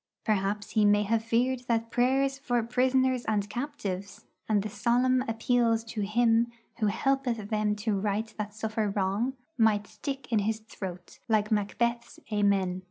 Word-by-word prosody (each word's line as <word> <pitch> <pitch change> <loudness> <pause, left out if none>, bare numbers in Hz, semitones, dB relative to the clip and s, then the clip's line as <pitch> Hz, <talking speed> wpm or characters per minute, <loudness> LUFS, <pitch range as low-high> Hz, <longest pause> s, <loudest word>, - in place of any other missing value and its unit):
Perhaps 205 -1 0
he 215 - +3
may 205 0 +4
have 225 +2 +1
feared 240 +3 +1
that 230 -1 0
prayers 270 +2 +2
for 245 -4 0
'prisoners 255 +1 +2
and 205 -2 0
captives,' 200 -7 -5 0.2
and 205 -2 +3
the - - -2
solemn 250 +4 +2
appeals 230 0 +2
to 225 -1 -5
Him 230 +3 +2 0.3
'who 215 - +2
helpeth 240 -1 0
them 210 -1 +1
to 210 -1 -1
right 210 +2 -2
that 210 0 -4
suffer 220 -1 -1
wrong,' 200 +6 0 0.3
might 210 -2 +3
stick 270 +3 -6
in 220 - +3
his 215 +2 0
throat 185 -5 -8
like 215 -1 +2
Macbeth's 235 +3 -1
'Amen.' 200 -3 +2
220 Hz, 155 wpm, -28 LUFS, 205-240 Hz, 0.3 s, may